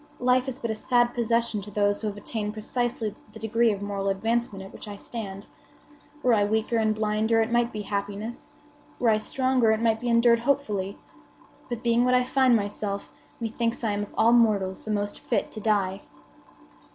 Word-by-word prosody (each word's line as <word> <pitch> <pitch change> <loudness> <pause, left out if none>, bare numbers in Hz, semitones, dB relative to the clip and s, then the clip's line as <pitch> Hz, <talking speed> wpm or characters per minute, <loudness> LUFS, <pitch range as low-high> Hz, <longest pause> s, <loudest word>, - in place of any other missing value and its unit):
Life 250 +1 +3
is 265 -1 -3
but 235 -4 -3
a - - 0
sad 240 +2 +2
possession 235 -2 0
to 205 - -9
those 205 0 +1
who 220 - -2
have 205 -1 -4
attained 210 0 -4
precisely 225 0 -2 0.2
the - - -9
degree 225 +1 +2
of 200 -1 -4
moral 200 -1 -2
advancement 220 0 -1
at 195 - -12
which - - -9
I 205 - -6
stand. 200 -2 -6 0.8
Were 250 - +4
I 210 -2 +4
weaker 220 +2 0
and 215 -1 +2
blinder 215 +1 +1
it 225 +1 +1
might 240 0 +2
be 210 -1 -5
happiness. 205 +3 -4 0.5
Were 240 - +2
I 215 -1 +4
stronger, 255 0 +1
it 220 - +1
might 225 -1 +2
be 245 +1 -2
endured 235 0 +5
hopefully. 220 -7 -1 0.7
But, 240 0 -4
being 235 0 +3
what 250 0 +3
I 250 - +4
find 255 -1 +3
myself, 205 -1 -3 0.3
methinks 230 0 -2
I 220 - +1
am 205 0 -1
of 205 - -6
all 230 +2 +5
mortals 205 -5 +2
the - - -6
most 205 -1 -2
fit - - -1
to 215 - -7
die." 200 -3 0
220 Hz, 195 wpm, -26 LUFS, 205-235 Hz, 0.8 s, endured